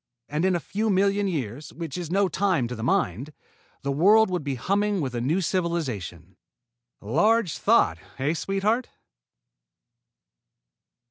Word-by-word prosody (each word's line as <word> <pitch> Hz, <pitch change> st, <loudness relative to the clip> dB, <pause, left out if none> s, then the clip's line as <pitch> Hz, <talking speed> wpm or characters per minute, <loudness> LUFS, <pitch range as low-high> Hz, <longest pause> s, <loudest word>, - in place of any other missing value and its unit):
And, 150 Hz, +4 st, -1 dB
in 190 Hz, -1 st, +2 dB
a -, -, 0 dB
few 215 Hz, +7 st, -2 dB
million 200 Hz, +1 st, +2 dB
years, 145 Hz, -, -4 dB
which 165 Hz, -4 st, -6 dB
is 175 Hz, -3 st, -5 dB
no 195 Hz, +2 st, +2 dB
time 180 Hz, -8 st, 0 dB
to 125 Hz, -, -5 dB
the 110 Hz, -, -7 dB
Mind, 120 Hz, -, 0 dB, 0.5 s
the 140 Hz, -, -1 dB
world 200 Hz, +8 st, +5 dB
would 180 Hz, -4 st, -2 dB
be 140 Hz, -2 st, -2 dB
humming 200 Hz, -, 0 dB
with 135 Hz, -6 st, -3 dB
a 120 Hz, -, -2 dB
new 155 Hz, +10 st, +1 dB
civilization. 130 Hz, -, -3 dB, 0.6 s
Large 180 Hz, -, +2 dB
thought, 80 Hz, +1 st, +3 dB, 0.2 s
eh, 140 Hz, +4 st, 0 dB
sweetheart?" 200 Hz, +8 st, -1 dB
170 Hz, 140 wpm, -25 LUFS, 130-195 Hz, 0.6 s, world